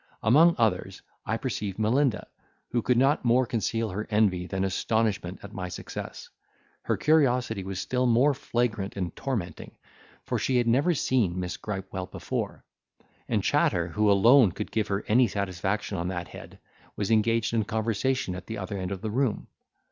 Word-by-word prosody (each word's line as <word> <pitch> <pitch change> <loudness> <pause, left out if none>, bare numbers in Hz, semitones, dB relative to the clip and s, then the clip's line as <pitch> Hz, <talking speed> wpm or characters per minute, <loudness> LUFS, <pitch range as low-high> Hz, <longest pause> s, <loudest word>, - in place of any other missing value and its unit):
Among 155 +10 +6
others 110 -7 0 0.2
I 110 - 0
perceived 105 -6 -4
Melinda, 120 +4 +1 0.5
who 120 - +1
could 125 +2 +2
not 135 +4 +3
more 125 +1 +3
conceal 115 -1 -1
her 105 +4 -4
envy 100 -5 +2
than 95 0 -2
astonishment 100 -1 0
at 100 +1 -10
my 90 -3 -4
success; - - -7 0.5
her - - -1
curiosity 125 -9 +2
was 95 0 -5
still 125 +7 0
more 125 +5 +4
flagrant 115 -7 -2
and 90 -3 -3
tormenting, 105 - -4 0.5
for - - -1
she 130 - +1
had 120 - +2
never 140 +9 +3
seen 110 -11 +1
Miss 90 -1 -3
Gripewell 95 -2 -5
before; - - -4 0.6
and - - +1
Chatter, 85 -1 +2
who 105 +4 +1
alone 110 +1 +6
could - - -5
give 110 -2 0
her 100 +1 -2
any 120 +3 +4
satisfaction 100 -1 -2
on 85 - -2
that 90 -2 -4
head, - - -11 0.4
was 105 +2 -2
engaged 115 +1 +2
in 115 -2 +2
conversation 110 +1 -1
at 90 0 -8
the 110 - -5
other 100 0 -4
end 90 +1 -4
of 95 -2 -4
the 110 - -2
room. 125 -1 -1
110 Hz, 170 wpm, -27 LUFS, 95-120 Hz, 0.6 s, Among